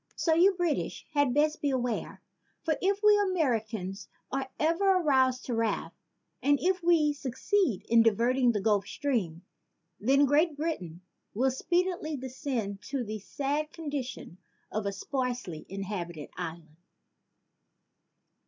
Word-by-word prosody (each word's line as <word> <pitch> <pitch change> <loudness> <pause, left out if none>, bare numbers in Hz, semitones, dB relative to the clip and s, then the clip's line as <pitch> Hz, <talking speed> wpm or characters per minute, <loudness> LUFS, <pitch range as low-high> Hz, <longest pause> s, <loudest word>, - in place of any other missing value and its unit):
So 325 - +2
you 370 +4 +5
British 350 -4 -1
had 285 -3 +3
best 300 +3 +2
beware, 250 -5 -2 0.4
for 320 -2 +1
if 395 +2 +1
we 420 -1 +6
Americans 220 - -1 0.2
are 270 0 -2
ever 340 +5 +3
aroused 260 -6 +2
to 245 - -3
wrath 225 -1 -1 0.5
and 285 0 +3
if 370 0 +1
we 330 -4 +4
succeed 285 - 0
in 230 0 +6
diverting 240 +3 +3
the 210 -3 -1
Gulf 205 -1 +2
Stream, 190 - -2 0.6
then 275 +6 +4
Great 295 +2 +2
Britain 185 - -3 0.3
will 260 +4 +2
speedily 345 +1 -1
descend 250 -6 -4
to 270 -2 -2
the 215 -1 -5
sad 290 +8 -2
condition 285 - -6 0.3
of 215 -1 -2
a - - 0
sparsely 245 - -4
inhabited 180 -5 -5
island." 165 -2 -7
265 Hz, 125 wpm, -29 LUFS, 215-310 Hz, 0.6 s, we